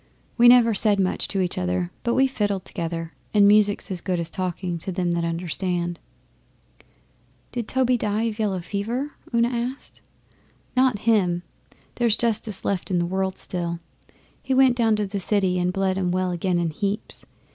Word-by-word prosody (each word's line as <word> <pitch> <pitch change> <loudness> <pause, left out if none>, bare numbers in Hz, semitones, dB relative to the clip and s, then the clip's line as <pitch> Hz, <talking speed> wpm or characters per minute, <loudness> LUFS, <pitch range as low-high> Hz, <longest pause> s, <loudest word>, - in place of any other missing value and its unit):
We 240 0 +6
never 240 -2 +7
said 205 -1 +3
much 185 -1 0
to 195 - -1
each 180 -1 -1
other, 90 -1 -1
but 235 - 0
we 265 - +4
fiddled 205 -7 -1
together, 165 -1 -5 0.2
and 200 -1 +6
music's 205 -1 +3
as 180 -2 -3
good 180 -2 -1
as 170 0 -4
talking 180 -1 -3
to 190 - -3
them 180 -1 -1
that 170 0 0
understand.' 175 +1 -2 1.5
'Did 235 -3 -4
Toby 255 -1 +2
die 215 0 -1
of 225 -1 -2
yellow 195 -4 0
fever?' 230 +10 -3 0.2
Una 235 0 +2
asked. 245 +2 -5 0.7
'Not 255 -3 +3
him! 180 -6 +2 0.5
There's 235 -3 +2
justice 220 -3 0
left 195 -3 -1
in 185 - +1
the 175 - +1
world 190 +1 -2
still. 170 -2 -3 0.6
He 265 - -1
went 260 -2 +5
down 225 -3 +3
to 210 -1 -1
the 200 0 -4
City 190 -2 +1
and 180 0 +1
bled 190 0 0
'em 180 -2 0
well 185 0 0
again 175 +1 0
in 170 -2 0
heaps. 200 +6 -3
195 Hz, 175 wpm, -24 LUFS, 175-225 Hz, 1.5 s, never